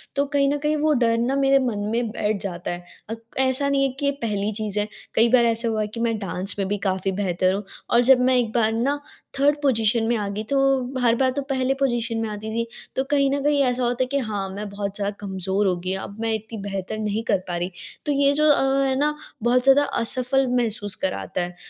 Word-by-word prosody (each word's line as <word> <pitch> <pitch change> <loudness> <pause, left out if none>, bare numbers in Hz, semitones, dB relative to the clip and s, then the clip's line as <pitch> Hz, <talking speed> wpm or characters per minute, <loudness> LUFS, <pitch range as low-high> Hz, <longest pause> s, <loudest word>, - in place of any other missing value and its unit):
तो 280 - +2
कहीं 280 -1 +3
न - - 0
कहीं 300 +1 0
वो 305 0 +2
डर 230 -3 +2
ना 245 +4 0
मेरे 275 0 +4
मन 235 -6 -1
में 230 0 0
बैठ 210 -3 -1
जाता 175 -2 -4
है। 175 0 -6 0.3
अ, - - -2 0.3
ऐसा 265 +2 +2
नहीं 275 -1 +2
है 270 - +2
कि 285 - -1
ये 280 - +3
पहली 210 -2 -1
चीज़ 210 -1 -3
है, 210 - 0 0.3
कई 230 +1 +5
बार 240 -1 +5
ऐसा 230 0 +1
हुआ 220 -1 0
है 210 - -1
कि 230 +2 -8
मैं 230 -1 0
डांस 190 0 -2
में 195 - 0
भी 205 +1 -1
काफ़ी 190 +1 0
बेहतर 185 -1 0
हूँ 200 - -3 0.3
और 235 - +5
जब 265 - +8
मैं 255 - +4
एक 230 -3 0
बार 225 -2 +2
ना 275 +6 0 0.4
3rd 290 +1 +4
पोजीशन 225 -4 +2
में 235 - +2
आ 205 -1 -2
गई, 210 +2 -4
तो 270 0 +1
हर 235 -1 +4
बार 260 +1 +2
तो 280 - -2
पहले 265 0 +1
पोजीशन 240 -3 0
में 220 - -2
आती 210 +1 -6
थी, 230 +1 -1 0.3
तो 265 - +1
कहीं 275 -1 +3
न 280 - 0
कहीं 290 -1 +3
ऐसा 250 -1 0
होता 245 +1 +1
है - - -3
कि 280 +2 -1
हाँ, 195 -2 -3
मैं 205 +2 -6
बहुत 200 0 -4
ज़्यादा 200 0 -1
कमज़ोर 190 0 -1
हो 180 - +2
गई 185 +2 -3
हूँ। 190 - -4
अब 200 +2 -9
मैं 225 -1 0
इतनी 220 +1 -5
बेहतर 195 +1 -4
नहीं 215 +1 -2
कर 200 -3 +2
पा 175 -1 -2
रही, 175 +2 -3 0.3
तो 295 - 0
ये 280 0 +3
जो 305 +1 +3
अ, 275 -1 +3
है 265 -1 +1
ना 300 +1 +1 0.3
बहुत 245 +1 +3
ज़्यादा 275 +2 +6 0.2
असफल 255 +3 +2
महसूस 210 -5 -1
कराता 185 -1 -2
है। 175 0 -5
230 Hz, 250 wpm, -23 LUFS, 205-270 Hz, 0.4 s, जब